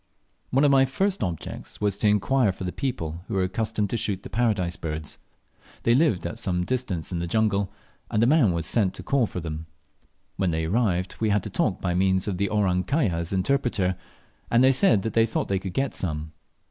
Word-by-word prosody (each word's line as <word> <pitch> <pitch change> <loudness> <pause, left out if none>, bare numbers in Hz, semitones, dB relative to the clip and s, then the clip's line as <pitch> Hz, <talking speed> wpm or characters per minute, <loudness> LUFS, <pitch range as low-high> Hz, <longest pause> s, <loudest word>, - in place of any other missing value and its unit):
One 135 +3 +2
of 145 - +5
my 135 -1 +6
first 190 +9 -1
objects 85 -5 -5
was 105 -2 +1
to 105 - +2
inquire 105 +3 +3
for 95 - -8
the 90 - -2
people 85 - -4
who - - -2
are 95 - +2
accustomed 105 +2 -1
to 120 - 0
shoot 100 -3 -2
the - - -9
Paradise 105 -7 +1
birds. 75 -2 -5 0.6
They 115 - +4
lived 130 - +2
at 85 - -4
some 90 -2 -1
distance 110 -11 -2
in 85 - -2
the 85 - -2
jungle, 100 0 +1 0.4
and 110 -1 +2
a - - +5
man 130 - +4
was 85 -1 -1
sent 100 -5 +1
to - - -8
call 135 -5 +2
them. 80 -3 -5 0.7
When 95 -2 +1
they 80 -1 -1
arrived, 95 -1 0
we 110 - +1
had 105 -1 +1
a - - -5
talk - - 0
by 90 - 0
means 95 +2 +2
of 95 -3 -2
the 100 - +1
"Orang 95 -4 +1
kaya" 140 - +1
as 85 0 -3
interpreter, 95 -2 +1 0.5
and 120 +2 +4
they 130 - +6
said 130 - +3
they 115 +1 +2
thought - - -2
they 95 -1 +1
could 95 -1 -6
get 135 +4 0
some. 75 -3 -4
100 Hz, 210 wpm, -25 LUFS, 90-120 Hz, 0.7 s, my